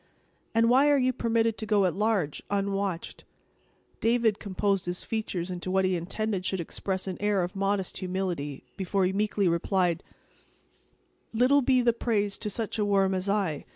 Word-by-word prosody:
"And 230 0 +4
why 265 +5 +5
are 290 - +5
you 255 -1 +2
permitted 230 -2 0
to 220 - -5
go 205 -2 +3
at 180 - +1
large, 200 -8 0
unwatched?" 195 -3 -2 0.8
David 230 -2 +2
composed 195 -2 -1
his 180 0 -2
features 190 -5 -3
into 180 0 -4
what 190 0 +2
he 185 -1 +1
intended 190 +3 -2
should 190 0 -1
express 185 +3 -3
an 190 -2 -4
air 205 -3 +2
of 175 +2 -5
modest 195 -1 -1
humility, 180 -7 -3
before 195 0 0
he 185 - 0
meekly 205 -1 +1
replied: 175 0 +1 1.3
"Little 255 +5 +4
be 255 -1 +3
the 235 -1 +4
praise 210 -4 -1
to 210 - -2
such 220 +1 -3
a - - +3
worm 195 -1 +2
as 185 +1 -2
I. 195 -8 -1
200 Hz, 170 wpm, -28 LUFS, 185-220 Hz, 1.3 s, why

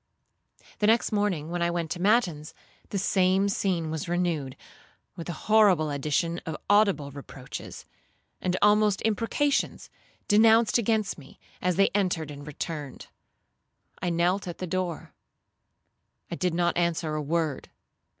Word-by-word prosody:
'The 210 - +2
next 225 +2 +3
morning, 195 -7 -1
when 175 0 -2
I 170 - +2
went 170 -2 -3
to 175 - -4
matins, 185 -8 +1 0.3
the 200 - -3
same 190 0 +2
scene 180 -5 -1
was 160 +1 -4
renewed, 170 -7 -1 0.6
with 170 -2 -7
the 175 - -3
horrible 200 -8 +4
addition 150 +4 -1
of 160 -1 -5
audible 200 -9 +3
reproaches, 135 -2 -9 0.6
and 185 0 0
almost 210 -1 +3
imprecations, 230 +6 0 0.4
denounced 225 +2 +5
against 220 -5 0
me, 135 -2 -16 0.2
as 180 -1 +1
they 195 +2 +4
entered 175 -7 -1
and 145 0 -10
returned. 150 -2 -6 0.9
I 180 - 0
knelt 175 +3 +1
at 175 - -6
the 185 - -4
door. 180 -2 -3 1.2
I - - -2
did 180 -1 -1
not 175 0 +1
answer 170 -2 0
a 155 - -1
word. 155 -2 -2
175 Hz, 140 wpm, -27 LUFS, 160-200 Hz, 1.2 s, denounced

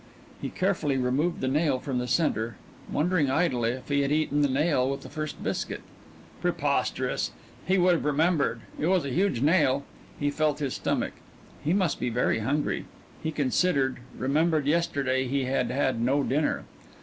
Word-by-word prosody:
He - - -3
carefully 175 -8 0
removed 130 +7 0
the 130 - 0
nail 145 0 +2
from 130 -1 -2
the 125 - -2
centre, 120 -6 +1 0.4
wondering 160 -2 +2
idly 130 -6 +1
if 130 - -9
he 140 0 +2
had 140 0 0
eaten 150 -1 +2
the 145 - +4
nail 135 -1 +2
with 135 0 -3
the - - -10
first 155 -1 -5
biscuit. - - -3 0.6
Preposterous! - - 0 0.4
He 190 +1 +3
would 180 0 +5
have 165 - -1
remembered 150 -5 +2 0.2
it 155 - +1
was 180 -4 +2
a - - -2
huge 175 -6 +1
nail. 145 -4 +3 0.4
He 145 0 +1
felt 150 0 +1
his 140 -3 -2
stomach. - - -1 0.5
He 150 - +1
must 185 -4 +1
be 125 - 0
very 120 -1 +1
hungry. 145 +7 -1 0.4
He 160 - -2
considered 140 -1 +1 0.2
remembered 155 +3 +1
yesterday 140 -5 +1
he 135 +1 0
had 130 +2 0
had 130 -4 0
no 135 +4 +2
dinner. 145 +3 0
145 Hz, 170 wpm, -27 LUFS, 130-160 Hz, 0.6 s, would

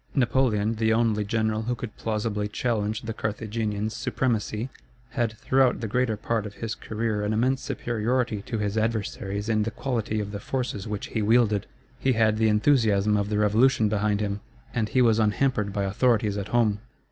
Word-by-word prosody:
Napoleon, 115 -4 +2
the 110 0 +2
only 110 -2 +2
general 110 +1 0
who 120 +2 -1
could 115 -2 -7
plausibly 105 -1 -2
challenge 110 -1 -1
the 115 0 -4
Carthaginian's 110 0 -3
supremacy, 115 -2 -1 0.4
had 120 -4 0
throughout 130 -1 +2
the 115 - -3
greater 120 0 0
part 110 0 -1
of 100 - -11
his 115 -1 -4
career 110 -1 -2
an 105 +1 0
immense 130 +4 +1
superiority 120 -1 -1
to 115 - -2
his 105 0 -1
adversaries 105 -2 -2
in 110 -1 +2
the 110 - 0
quality 115 -2 -2
of 100 -1 -4
the 100 - -5
forces 120 -3 -3
which 105 -2 -4
he 110 - -1
wielded. 105 -2 +3 0.3
He 135 - +2
had 110 -1 +3
the 110 0 +3
enthusiasm 105 -3 +3
of 100 0 0
the 105 - 0
Revolution 110 +2 +3
behind 105 0 +1
him, 100 -1 -2 0.3
and 110 -3 0
he 130 +2 +3
was 115 -2 +4
unhampered 110 -1 +1
by 100 0 -1
authorities 105 +1 +2
at 100 -1 -3
home. 110 -2 +2
110 Hz, 180 wpm, -26 LUFS, 105-115 Hz, 0.4 s, was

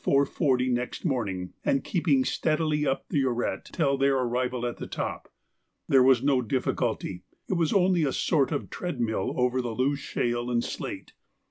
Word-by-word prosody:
40 140 -2 +2
next 125 +5 -2
morning, 100 - -2
and 135 - +1
keeping 150 -8 +2
steadily 155 -1 0
up 135 - -1
the 145 - +1
arête 120 -6 -1
till 140 -1 0
their 135 0 +3
arrival 125 -1 -1
at 120 - -3
the - - -6
top. - - -5 0.6
There 135 - +5
was 130 -1 +5
no 135 -2 +3
difficulty, 115 -6 -2 0.3
it - - -1
was 170 -3 +1
only 180 -3 +3
a 140 - +1
sort 145 -2 +1
of 145 - -3
treadmill 120 - -2
over 125 0 +2
the 120 -2 -4
loose 140 +3 +1
shale 120 -2 -2
and 120 -1 +1
slate. - - -6
130 Hz, 165 wpm, -27 LUFS, 120-145 Hz, 0.6 s, There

